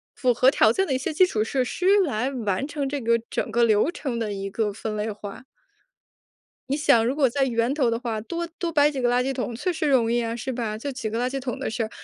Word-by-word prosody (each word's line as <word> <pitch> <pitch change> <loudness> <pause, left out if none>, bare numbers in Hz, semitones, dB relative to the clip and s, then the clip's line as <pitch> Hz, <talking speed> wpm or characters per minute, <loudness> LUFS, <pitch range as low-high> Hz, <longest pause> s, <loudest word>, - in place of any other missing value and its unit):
符 250 -2 +2
合 255 +3 +5
条 220 -6 +4
件 385 +11 0
的 - - 0
一 - - +2
些 265 - -3
基 340 +5 +5
础 215 -10 0
设 255 +3 -1
施 360 - -4 0.2
来 250 -3 -1
完 230 -2 -2
成 290 -1 -3
这 280 0 -3
个 230 0 +2
整 - - -2
个 235 +1 +2
流 220 +8 +3
程 265 -8 -4
的 220 -2 -2
一 195 0 -4
个 210 +1 -1
分 215 +1 -5
类 210 +1 -2
化。 205 +1 -9 1.3
你 280 - +1
想 235 -6 +4
如 245 +4 0
果 285 -3 +3
在 270 +3 0
源 235 0 0
头 275 -5 +2
的 230 0 -1
话， 230 -3 -3
多 340 +9 -4
多 340 -2 -2
摆 295 -1 +4
几 270 -3 -4
个 245 - +2
垃 245 +1 +2
圾 270 +1 -1
桶 245 -2 -3
确 360 +10 -1
实 315 -2 -1
容 240 -4 +3
易 240 - +2
呀， 230 -1 -2
是 255 +3 -4
吧？ 225 -3 -3
就 280 +6 -4
几 250 -4 -4
个 225 - -3
垃 245 +1 0
圾 270 +1 -3
桶 250 -3 -4
的 - - -4
事 225 - -3
儿， 220 - -4
245 Hz, 295 characters per minute, -24 LUFS, 225-275 Hz, 1.3 s, 合